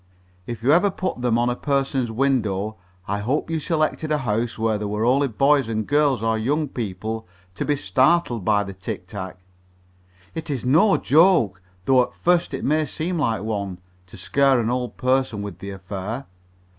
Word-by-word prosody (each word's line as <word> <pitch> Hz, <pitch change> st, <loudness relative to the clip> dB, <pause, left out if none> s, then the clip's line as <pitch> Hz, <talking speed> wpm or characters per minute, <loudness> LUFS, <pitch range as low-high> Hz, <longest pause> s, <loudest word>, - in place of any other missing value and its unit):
If 115 Hz, -2 st, -6 dB
you 135 Hz, -, +4 dB
ever 180 Hz, +6 st, +5 dB
put 185 Hz, -8 st, -4 dB
them 120 Hz, -2 st, +2 dB
on 120 Hz, +1 st, +2 dB
any 120 Hz, -, -5 dB
person's 135 Hz, -4 st, 0 dB
window, 110 Hz, -5 st, 0 dB, 0.3 s
I 100 Hz, +1 st, -1 dB
hope 135 Hz, +10 st, -1 dB
you 160 Hz, -, 0 dB
selected 155 Hz, 0 st, -1 dB
a 150 Hz, -, +3 dB
house 115 Hz, -3 st, -1 dB
where 110 Hz, -1 st, 0 dB
there 105 Hz, -, -3 dB
were 105 Hz, +2 st, -1 dB
only 135 Hz, +3 st, +3 dB
boys 135 Hz, +2 st, +3 dB
and 110 Hz, -1 st, -1 dB
girls 145 Hz, -5 st, +2 dB
or 110 Hz, -1 st, +1 dB
young 145 Hz, +6 st, 0 dB
people 110 Hz, -2 st, -4 dB, 0.3 s
to -, -, -3 dB
be 145 Hz, -, +1 dB
startled 130 Hz, -, +2 dB
by 105 Hz, +1 st, +2 dB
the 100 Hz, -1 st, -7 dB
tic 95 Hz, -1 st, -6 dB
tac. 95 Hz, -1 st, -7 dB, 1.0 s
It 160 Hz, 0 st, -6 dB
is 135 Hz, -4 st, -3 dB
no 165 Hz, +11 st, +4 dB
joke, 145 Hz, -, +4 dB, 0.2 s
though 130 Hz, -1 st, +5 dB
at 125 Hz, -, -3 dB
first 175 Hz, -4 st, +1 dB
it -, -, -5 dB
may 155 Hz, +1 st, +2 dB
seem 165 Hz, +6 st, -3 dB
like 115 Hz, -8 st, 0 dB
one, 100 Hz, -4 st, -3 dB, 0.3 s
to 95 Hz, -, -13 dB
scare 135 Hz, +7 st, +3 dB
an 115 Hz, 0 st, 0 dB
old 125 Hz, -1 st, -3 dB
person 130 Hz, -5 st, 0 dB
with 100 Hz, -3 st, -7 dB
the 100 Hz, -, -7 dB
affair. 100 Hz, +6 st, -5 dB
120 Hz, 185 wpm, -23 LUFS, 105-145 Hz, 1.0 s, ever